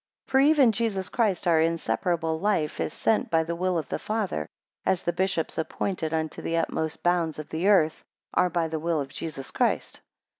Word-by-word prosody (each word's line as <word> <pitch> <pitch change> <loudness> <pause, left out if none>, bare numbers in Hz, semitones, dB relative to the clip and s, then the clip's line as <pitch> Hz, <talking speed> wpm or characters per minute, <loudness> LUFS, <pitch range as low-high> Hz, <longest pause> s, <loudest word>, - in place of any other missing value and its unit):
12 - - -17
For 265 - +5
even 280 -7 +5
Jesus 210 -4 -1
Christ, 210 -6 0
our 165 -2 +4
inseparable 165 0 0
life, 190 -6 0
is - - -1
sent 220 - +1
by 165 -1 +3
the 170 +1 -3
will 180 +1 0
of 155 -4 -3
the - - -2
Father; 205 - -2 0.4
as 185 - +1
the 175 - 0
bishops, 185 -4 -1
appointed 160 0 -2
unto 160 -1 -2
the 165 - -1
utmost 160 -1 -2
bounds 175 -3 +1
of 155 - -7
the 165 +5 -1
earth, 165 -7 +3 0.3
are 180 - +3
by 170 -1 0
the 160 0 -3
will 165 0 0
of 140 -1 -3
Jesus 140 -5 -5
Christ. - - 0
170 Hz, 195 wpm, -26 LUFS, 160-190 Hz, 0.4 s, For